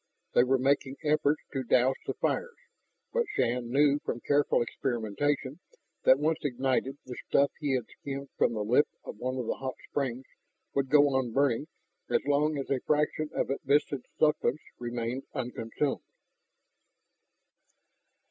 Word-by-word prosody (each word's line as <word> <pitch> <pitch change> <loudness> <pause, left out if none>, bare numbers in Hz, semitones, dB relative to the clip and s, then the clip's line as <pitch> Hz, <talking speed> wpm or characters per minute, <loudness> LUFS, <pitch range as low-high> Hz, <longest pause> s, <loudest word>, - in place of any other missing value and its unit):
They 120 - +6
were 130 +1 +3
making 135 +1 +1
efforts 150 0 +2
to 135 - -1
douse 130 +1 +3
the - - -2
fires, 485 0 -1 0.6
but 475 -2 +1
Shann 120 0 0
knew 145 +2 +4
from 120 - -3
careful 145 0 +2
experimentation 130 - -2 0.5
that 130 - +7
once 155 +2 +1
ignited 135 0 0
the 125 -1 -7
stuff 140 -1 +3
he 145 -3 0
had 125 -3 -1
skimmed 140 -1 -7
from - - +2
the 105 -2 -2
lip 125 +8 +4 0.2
of - - -9
one 130 +1 -2
of 125 - -2
the - - -2
hot 130 -1 -4
springs 130 -2 -2 0.5
would 135 -1 0
go 145 0 +6
on 130 -4 0
burning 140 +1 +2 0.4
as - - +1
long 145 +1 +2
as 135 - -4
a 135 - +2
fraction 150 +2 0
of - - 0
its 135 - -3
viscid 140 -1 +1
substance 150 -1 +2 0.2
remained 120 +2 -3
unconsumed. 125 +1 -2
135 Hz, 150 wpm, -29 LUFS, 125-145 Hz, 0.6 s, that